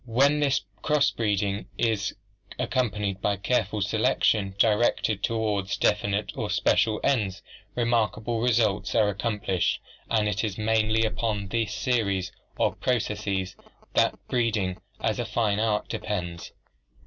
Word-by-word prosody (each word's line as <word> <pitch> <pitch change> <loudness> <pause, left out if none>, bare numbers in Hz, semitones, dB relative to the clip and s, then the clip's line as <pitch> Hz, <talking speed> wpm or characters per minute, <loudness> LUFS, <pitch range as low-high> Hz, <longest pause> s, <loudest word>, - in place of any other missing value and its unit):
When 140 +6 +3
this 140 -2 +2 0.2
cross 150 -2 +3
breeding 100 -2 -1
is 110 -4 0 0.4
accompanied 105 -6 -1
by 100 0 +1
careful 105 0 0
selection 105 -1 +1
directed 110 -1 +2
toward 105 -4 0
definite 105 0 +1
or - - -3
special 110 -1 +2
ends, 105 -8 0 0.3
remarkable 115 -1 0
results 115 -4 +1
are 105 -2 +4
accomplished, 100 -2 -1 0.3
and 110 -2 +2
it 105 +1 -1
is 105 -3 -2
mainly 110 0 +2
upon 105 -3 -2
this 115 0 -1
series 100 -8 0 0.3
of - - +1
processes 105 -6 -1 0.4
that - - +3
breeding 110 -7 0 0.2
as - - -1
a - - +1
fine 105 -3 0
art 110 -1 0
depends. 85 -4 -4
105 Hz, 125 wpm, -26 LUFS, 100-115 Hz, 0.4 s, are